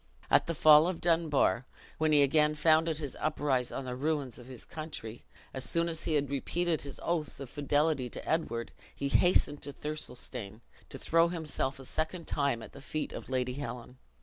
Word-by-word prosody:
At - - +5
the 170 - -2
fall 155 +2 +7
of 180 -2 -2
Dunbar, 160 -7 +2 0.3
when 155 0 +2
he 145 -1 +6
again 150 +2 +3
founded 160 +1 +3
his 145 -4 -5
uprise 145 -5 0
on 135 - -5
the 125 -1 -4
ruins 140 -2 -2
of 120 - -12
his 130 -3 -10
country, 150 -8 -7 0.3
as 130 - -3
soon 170 +6 +1
as 165 -1 -3
he 155 - +1
had 145 -1 +1
repeated 165 +4 -1
his 140 -1 -6
oaths 165 -5 -2
of 135 -3 -8
fidelity 145 -2 +1
to - - -6
Edward, 120 -8 -1 0.2
he 140 - -2
hastened 160 -3 +3
to 145 - -4
Thirlestane, 125 -8 -2 0.3
to - - -8
throw 165 +1 +3
himself 155 -5 -3
a 135 - -9
second 160 +5 -3
time 140 -5 0
at - - -11
the 140 - -12
feet 155 +2 -4
of - - -8
Lady 125 -1 -1
Helen. 125 -2 -7
145 Hz, 190 wpm, -31 LUFS, 130-160 Hz, 0.3 s, fall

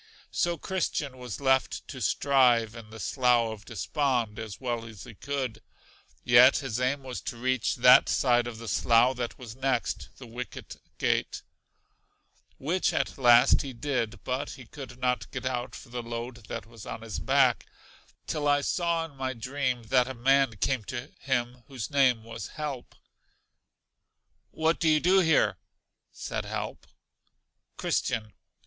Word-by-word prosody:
So 175 -1 0
Christian 150 -7 -2
was 125 -4 -6
left 130 -1 +1
to - - -7
strive 125 -5 +3
in 115 -2 -11
the 110 0 -10
Slough 120 +2 +2
of 105 -1 -12
Despond 120 -2 -1
as 110 -3 -7
well 120 -3 -2
as 110 -4 -11
he 120 - -11
could; 130 0 -4 0.6
yet 120 +2 +7
his 130 -5 -3
aim 130 +2 0
was 130 -2 -6
to 120 - -6
reach 130 -1 0
that 125 +1 +7
side 120 -2 +3
of 120 -2 -6
the 115 0 -9
slough 120 +5 +3
that 120 -2 -4
was 120 -3 -9
next 130 -2 -1
The 130 - -10
Wicket 120 +2 -8 0.2
Gate, - - 0 1.1
which 170 +7 0
at - - -1
last 120 -1 +6
he 135 -2 -6
did, 120 -3 -3
but 130 +3 -2
he 125 - -11
could 135 +1 -10
not 125 -4 -1
get - - -6
out 125 -1 -3
for - - -11
the 120 0 -4
load 120 -1 -7
that - - -5
was 115 -2 -12
on 115 - -6
his 110 -3 -5
back; - - +2 0.6
till 150 -1 -2
I 145 0 +4
saw 170 +1 0
in 150 -4 -14
my 130 0 -2
dream 125 0 -2
that 125 +2 +2
a 130 - -5
man 135 -1 +3
came 130 +1 0
to 125 +4 -6
him 125 -2 -2
whose 130 -4 -6
name 130 -5 +3
was 115 0 -7
Help. 145 -5 -5 1.5
What 160 +1 0
do 165 - +3
you 155 0 +4
do 185 +4 +4
here? 145 - +3 0.5
said - - -5
Help. - - -5 0.9
Christian. 110 -4 -1
125 Hz, 160 wpm, -28 LUFS, 115-135 Hz, 1.5 s, yet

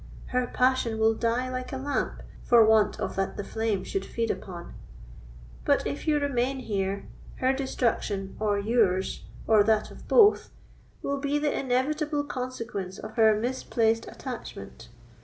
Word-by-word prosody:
Her 250 0 +1
passion 250 -3 +1
will 220 0 +4
die 235 +3 0
like 255 0 -4
a 265 - -3
lamp 280 +2 -2 0.2
for 235 -2 +6
want 215 -1 +3
of - - -3
that 195 0 -1
the - - -3
flame 220 -3 -1
should 195 0 -3
feed 230 +3 -2
upon; 175 -3 -7 0.9
but, - - +2
if 145 - -4
you 305 -1 +4
remain 270 -2 0
here, 200 -3 -2 0.3
her 260 +1 +1
destruction, 230 -7 -1
or 210 -1 +1
yours, 200 -3 +1 0.2
or 220 -2 +5
that 215 0 +1
of - - -13
both, 430 -3 +5 0.5
will 280 0 -1
be 285 +1 0
the 295 0 0
inevitable 290 +3 0
consequence 240 -8 -5
of - - -8
her 220 -2 +4
misplaced 230 -2 0
attachment. 115 - -8
230 Hz, 150 wpm, -27 LUFS, 210-260 Hz, 0.9 s, for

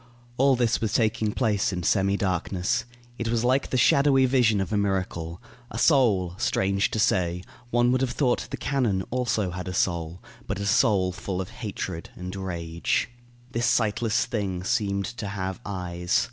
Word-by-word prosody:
All 135 0 +4
this 120 -2 +1
was 110 - -1
taking 110 -2 +1
place 105 -2 +1
in 90 -2 -3
semi 100 +2 +2
darkness. 95 +4 -1 0.3
It 115 - -2
was 115 0 0
like 130 +3 +2
the 130 - 0
shadowy 135 +1 +5
vision 125 -5 +3
of 95 +3 -2
a - - +2
miracle. 95 -4 -1 0.3
A - - -7
soul 105 - +3
strange 100 +1 +1
to - - -3
say, 90 -4 +1 0.3
one 120 +1 +3
would 130 0 +2
have 130 - +1
thought 125 -1 0
the - - -4
cannon 120 -10 0
also 110 -6 0
had 90 +1 -6
a 90 - -4
soul; 85 -2 -1 0.3
but 100 0 -3
a 100 - -3
soul 100 -3 +3
full 90 0 -4
of 95 - -5
hatred 95 -6 -5
and 90 +1 -6
rage. 85 +2 -2 0.4
This 115 -1 0
sightless 110 0 +1
thing 95 -5 -3
seemed 100 0 0
to 115 -3 -5
have 95 -1 -4
eyes. 90 -3 -1
100 Hz, 175 wpm, -26 LUFS, 90-120 Hz, 0.4 s, shadowy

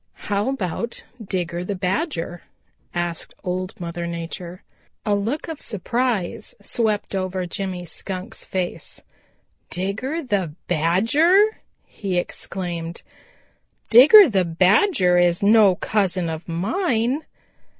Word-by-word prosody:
"How 205 +4 +1
about 235 -1 -3 0.2
Digger 175 -3 -3
the 200 +2 -3
Badger?" 180 - -2 0.5
asked 175 -1 -4
Old 185 +1 -4
Mother 170 0 -4
Nature. 170 +2 -6 0.4
A 210 - +2
look 225 +12 -1
of 320 -3 -6
surprise 220 -1 -2
swept 210 0 -1
over 185 -1 -2
Jimmy 180 0 -4
Skunk's 185 +2 -5
face. 185 -2 -4 0.7
"Digger 220 - -2
the 195 - -1
Badger!" 230 - +3 0.3
he 190 -3 -4
exclaimed. 175 -2 -4 0.9
"Digger 305 - +10
the 195 -7 +2
Badger 180 - +3
is 175 +1 +2
no 205 -2 +6
cousin 185 -4 0
of 160 +1 -6
mine!" 235 - 0
190 Hz, 105 wpm, -22 LUFS, 175-230 Hz, 0.9 s, Digger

